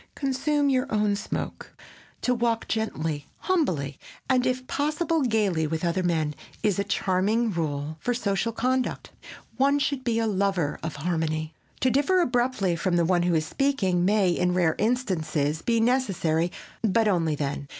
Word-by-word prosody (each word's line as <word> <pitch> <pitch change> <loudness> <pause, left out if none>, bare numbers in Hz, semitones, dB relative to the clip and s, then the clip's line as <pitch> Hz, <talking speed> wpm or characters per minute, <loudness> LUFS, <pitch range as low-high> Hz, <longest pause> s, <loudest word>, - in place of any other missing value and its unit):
"Consume 285 +2 0
your 265 +1 0
own 210 -1 +2
smoke." - - -5 0.5
"To 250 - +2
walk 235 -1 0
gently, 160 -9 -2
humbly, 175 - 0 0.3
and, 255 -1 +2
if 255 0 -1
possible, 305 +4 0
gaily 210 - +1
with 160 +2 -2
other 170 +2 +1
men" 160 -4 0 0.3
is 205 -3 +2
a - - +2
charming 200 +4 +1
rule 155 -3 -3
for 245 +8 -1
social 225 0 0
conduct. 255 +3 -1 0.5
One 280 +2 +3
should 280 -2 -1
be 235 -2 0
a 230 - +1
lover 195 -7 0
of 160 -2 -4
harmony. 155 0 -2 0.3
To 260 - +3
differ 290 +8 +3
abruptly 240 - +1
from 175 +1 0
the 170 -1 +3
one 175 0 +2
who 175 -1 +2
is 155 -1 +1
speaking 195 - +1
may, 195 -1 +3
in 180 +1 +1
rare 170 -3 +3
instances, 160 - 0
be 230 -1 +1
necessary, 195 -9 +1 0.3
but 225 0 +2
only 165 -6 +1
then. 140 -1 -3
200 Hz, 160 wpm, -26 LUFS, 165-250 Hz, 0.5 s, One